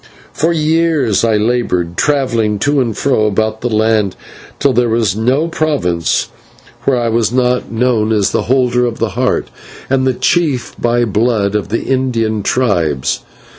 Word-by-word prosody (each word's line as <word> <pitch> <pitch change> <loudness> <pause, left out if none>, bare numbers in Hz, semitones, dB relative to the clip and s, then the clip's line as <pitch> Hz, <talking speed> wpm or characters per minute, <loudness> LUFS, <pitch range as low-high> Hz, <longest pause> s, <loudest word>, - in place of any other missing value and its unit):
For 160 +3 +1
years 155 - +1
I 110 -2 +2
laboured, 105 -7 -1
travelling 115 -7 0
to 145 +6 +1
and 115 -4 -2
fro 125 -6 +1
about 110 +1 -1
the 120 - -1
land 110 -3 +1 0.4
till 140 - +2
there 120 0 +2
was 110 -5 +1
no 130 +9 +1
province 140 - -1 0.6
where 135 -2 +2
I 120 -1 0
was 115 -1 +1
not 125 -1 0
known 115 -2 +1
as 105 -3 +1
the - - -2
Holder 125 -2 +2
of 115 - -4
the 115 - -1
Heart, 90 - -1 0.4
and 130 -1 +2
the 130 - +1
chief 130 -1 0
by 120 0 +1
blood 105 -1 0
of 105 -2 -2
the 115 - -1
Indian 115 -5 -1
tribes. 85 - 0
120 Hz, 160 wpm, -15 LUFS, 110-130 Hz, 0.6 s, I